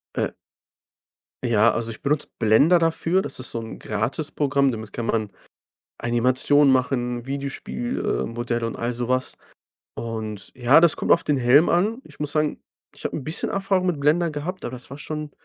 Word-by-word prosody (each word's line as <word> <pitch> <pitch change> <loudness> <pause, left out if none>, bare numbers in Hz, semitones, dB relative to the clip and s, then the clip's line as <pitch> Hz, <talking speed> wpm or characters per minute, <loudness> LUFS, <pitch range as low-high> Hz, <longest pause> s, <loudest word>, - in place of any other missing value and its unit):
Äh - - 0 1.1
ja, 115 -1 +4
also, 115 -1 -2
ich 110 - -9
benutze 150 +1 0
Blender 130 +11 +5
dafür. 165 +3 +1
Das - - -6
ist 130 - -5
so 115 - -3
'n 110 - -8
Gratisprogramm. 140 +5 0
Damit 110 -1 -7
kann 115 -1 -4
man 110 -3 0 0.7
Animationen 130 +4 +3
machen, 125 -2 0
Videospiel 140 - -4
äh, - - -1
Modelle 120 0 -2
und 115 - -4
all 120 +1 -2
sowas. 125 +2 -1 0.6
Und 110 -4 -5
ja, 130 +5 +6
das 170 -3 +5
kommt - - -1
auf 170 - +5
den 145 -2 +1
Helm 130 +6 +5
an. 215 +9 +1
Ich - - -17
muss 150 -1 -3
sagen, 150 -1 0 0.3
ich - - -13
habe - - -2
'n 140 - -4
bisschen 155 +2 -2
Erfahrung 195 -1 0
mit 170 -6 0
Blender 160 +3 +2
gehabt, 165 +6 -5
aber - - -4
das 125 0 -8
war 140 - -8
schon, 150 -1 -5
135 Hz, 180 wpm, -23 LUFS, 120-155 Hz, 1.1 s, ja